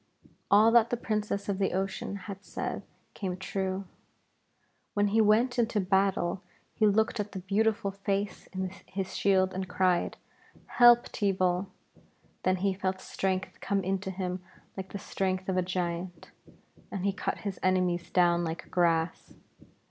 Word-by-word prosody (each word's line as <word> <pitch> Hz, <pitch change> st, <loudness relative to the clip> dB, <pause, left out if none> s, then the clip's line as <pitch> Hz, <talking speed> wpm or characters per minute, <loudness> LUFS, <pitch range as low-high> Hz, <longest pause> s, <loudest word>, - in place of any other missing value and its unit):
All 215 Hz, +3 st, +6 dB
that 235 Hz, -1 st, +5 dB
the 245 Hz, -, 0 dB
Princess 210 Hz, -3 st, -2 dB
of 200 Hz, -1 st, -1 dB
the 195 Hz, -, +1 dB
Ocean 190 Hz, +1 st, -2 dB
had 200 Hz, -1 st, -7 dB
said -, -, -4 dB, 0.3 s
came 185 Hz, -3 st, -4 dB
true. 190 Hz, +1 st, -3 dB, 1.1 s
When 205 Hz, 0 st, +3 dB
he 220 Hz, +2 st, +4 dB
went 235 Hz, +4 st, +3 dB
into 230 Hz, -2 st, +2 dB
battle 190 Hz, -2 st, +1 dB, 0.3 s
he 215 Hz, -, +3 dB
looked 220 Hz, +2 st, +2 dB
at 205 Hz, 0 st, -3 dB
the -, -, -5 dB
beautiful 205 Hz, +2 st, +1 dB
face 195 Hz, 0 st, -3 dB
in 190 Hz, -1 st, -4 dB, 0.2 s
his 190 Hz, -1 st, -4 dB
shield 190 Hz, -1 st, +3 dB
and 190 Hz, 0 st, -3 dB
cried 180 Hz, -1 st, +1 dB, 0.5 s
'Help, 240 Hz, 0 st, +6 dB
Teeval.' 185 Hz, -2 st, +1 dB, 0.7 s
Then 185 Hz, -, +2 dB
he 195 Hz, -, +3 dB
felt 185 Hz, 0 st, -2 dB
strength 190 Hz, 0 st, -2 dB
come 200 Hz, -1 st, 0 dB
into 190 Hz, +1 st, -1 dB
him 185 Hz, -1 st, -3 dB, 0.3 s
like 190 Hz, -1 st, -6 dB
the -, -, -4 dB
strength 185 Hz, -1 st, -2 dB
of 190 Hz, -, 0 dB
a 185 Hz, -, +3 dB
giant, 175 Hz, -1 st, -3 dB, 0.6 s
and 195 Hz, -1 st, -4 dB
he 200 Hz, -, +2 dB
cut -, -, -2 dB
his 195 Hz, -2 st, -3 dB
enemies 180 Hz, -2 st, +1 dB
down 175 Hz, -1 st, +3 dB
like 165 Hz, 0 st, -5 dB
grass. 165 Hz, -2 st, +1 dB
190 Hz, 150 wpm, -29 LUFS, 185-205 Hz, 1.1 s, All